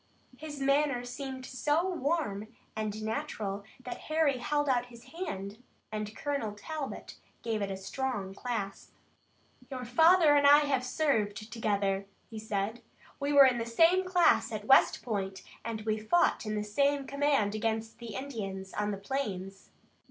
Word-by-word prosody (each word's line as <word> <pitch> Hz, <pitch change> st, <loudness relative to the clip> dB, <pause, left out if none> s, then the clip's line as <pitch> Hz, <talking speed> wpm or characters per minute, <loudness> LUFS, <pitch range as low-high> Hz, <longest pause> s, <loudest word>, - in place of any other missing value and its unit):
His 295 Hz, +1 st, -8 dB
manner 275 Hz, -2 st, +2 dB
seemed 260 Hz, +1 st, -6 dB
so 295 Hz, +7 st, 0 dB
warm 285 Hz, -, -1 dB, 0.3 s
and 215 Hz, 0 st, -3 dB
natural 205 Hz, -2 st, -3 dB, 0.2 s
that 250 Hz, -, -6 dB
Harry 310 Hz, -4 st, +2 dB
held 290 Hz, +4 st, 0 dB
out 245 Hz, -2 st, +2 dB
his 235 Hz, -1 st, -14 dB
hand, 215 Hz, -, -5 dB, 0.3 s
and 215 Hz, 0 st, -4 dB
Colonel 280 Hz, -8 st, -2 dB
Talbot 285 Hz, +7 st, -6 dB, 0.3 s
gave 225 Hz, -2 st, -1 dB
it 200 Hz, -, -1 dB
a 195 Hz, -, -4 dB
strong 200 Hz, -1 st, -3 dB
clasp. 205 Hz, -3 st, -5 dB, 0.7 s
"Your 255 Hz, -2 st, -5 dB
father 320 Hz, +5 st, +6 dB
and 285 Hz, -1 st, +5 dB
I 290 Hz, +1 st, +8 dB
have 275 Hz, -3 st, +1 dB
served 225 Hz, -7 st, 0 dB
together," 200 Hz, -3 st, 0 dB, 0.2 s
he 220 Hz, -, -6 dB
said. 215 Hz, +2 st, -2 dB, 0.4 s
"We 280 Hz, +1 st, -1 dB
were 285 Hz, -1 st, +9 dB
in 250 Hz, -2 st, +3 dB
the 230 Hz, -, -2 dB
same 330 Hz, +10 st, +4 dB
class 365 Hz, -2 st, +3 dB
at -, -, -5 dB
West -, -, +5 dB
Point, 195 Hz, -4 st, -3 dB, 0.2 s
and 225 Hz, -1 st, -4 dB
we 215 Hz, 0 st, -1 dB
fought 225 Hz, +1 st, +2 dB
in 215 Hz, -, -1 dB
the 210 Hz, -, -1 dB
same 280 Hz, +6 st, +1 dB
command 280 Hz, -7 st, +1 dB
against 225 Hz, +1 st, -2 dB
the 235 Hz, -3 st, -7 dB
Indians 195 Hz, -8 st, -5 dB
on 210 Hz, 0 st, -1 dB
the 200 Hz, -, -2 dB
plains. 195 Hz, -4 st, -4 dB
240 Hz, 155 wpm, -30 LUFS, 210-285 Hz, 0.7 s, were